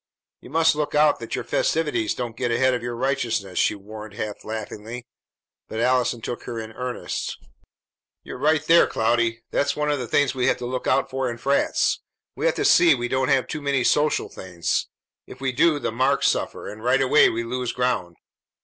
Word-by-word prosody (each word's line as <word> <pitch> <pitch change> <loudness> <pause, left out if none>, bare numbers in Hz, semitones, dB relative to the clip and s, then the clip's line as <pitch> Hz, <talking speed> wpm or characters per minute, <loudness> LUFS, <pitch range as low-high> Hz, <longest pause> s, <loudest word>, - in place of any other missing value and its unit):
"You - - -14
must 160 +3 +3
look 150 -1 -2
out 150 0 +4
that - - -5
your - - -3
festivities 420 -9 0
don't 120 -2 -4
get 120 - -2
ahead 130 +2 +2
of 125 - -2
your 120 0 -4
righteousness," 115 -7 -1
she - - +2
warned 105 +1 -10
half 105 -1 -5
laughingly; 110 +2 -6 0.6
but 110 - -5
Allison 125 -1 +1
took 120 - -5
her 120 -2 -5
in 110 0 -7
earnest. 125 +2 -4 0.9
"You're - - -8
right 155 +2 +2
there, 170 +1 +6
Cloudy. 115 0 0
That's 145 - +1
one 150 0 0
of 145 - 0
the 125 - -4
things 140 +2 +2
we 125 -2 0
have - - +2
to 125 - -6
look 125 +1 -3
out 135 - +1
for 130 -1 -1
in 120 - -5
frats. 140 +4 +1 0.4
We - - 0
have - - +1
to 415 - -1
see 170 - +6
we 120 -1 -3
don't 130 -1 0
have 135 -2 +3
too 150 - -5
many 140 -3 +1
social 150 +3 +2
things. 90 -3 -3 0.4
If 125 - -11
we 135 -1 -1
do, 155 +4 +3
the 140 - -2
marks 130 +4 +2
suffer; - - -3
and 110 +1 -9
right 125 +2 +3
away 135 +3 +5
we 115 +1 -2
lose 125 +1 -3
ground. 125 -9 -1
125 Hz, 205 wpm, -23 LUFS, 115-140 Hz, 0.9 s, there